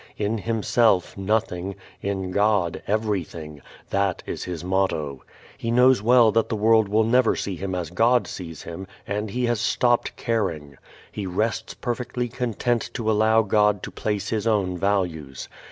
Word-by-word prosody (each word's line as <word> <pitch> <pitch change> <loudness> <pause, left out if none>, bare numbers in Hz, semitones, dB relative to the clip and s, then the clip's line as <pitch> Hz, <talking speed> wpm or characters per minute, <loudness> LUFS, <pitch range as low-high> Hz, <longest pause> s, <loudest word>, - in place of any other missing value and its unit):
In 105 +2 -1
himself, 110 -2 +2
nothing; 95 -2 -1 0.3
in 95 -2 -3
God, 100 -3 +1
everything. 90 -8 -2 0.3
That 100 -2 0
is - - -5
his 90 -2 -5
motto. 90 -7 -1 0.4
He 115 - -3
knows 125 -1 +5
well 120 0 +5
that 115 +1 +1
the - - -1
world 110 0 +4
will 110 +2 +3
never 120 +1 +3
see 100 - -3
him 95 +1 -4
as 85 -3 -4
God 115 +6 +3
sees 85 -3 -8
him 85 +3 -7 0.2
and 105 +1 -3
he 125 +5 -1
has 120 -2 0
stopped 120 0 +1
caring. 80 - -2 0.3
He 100 -2 -5
rests 105 +5 -2
perfectly 125 0 -3
content 120 0 -1
to 110 -3 0
allow 110 +1 +4
God 105 -1 +2
to - - -6
place 105 -2 -2
His 110 0 -1
own 100 -5 +1
values. 85 -8 -2
105 Hz, 155 wpm, -24 LUFS, 90-115 Hz, 0.4 s, knows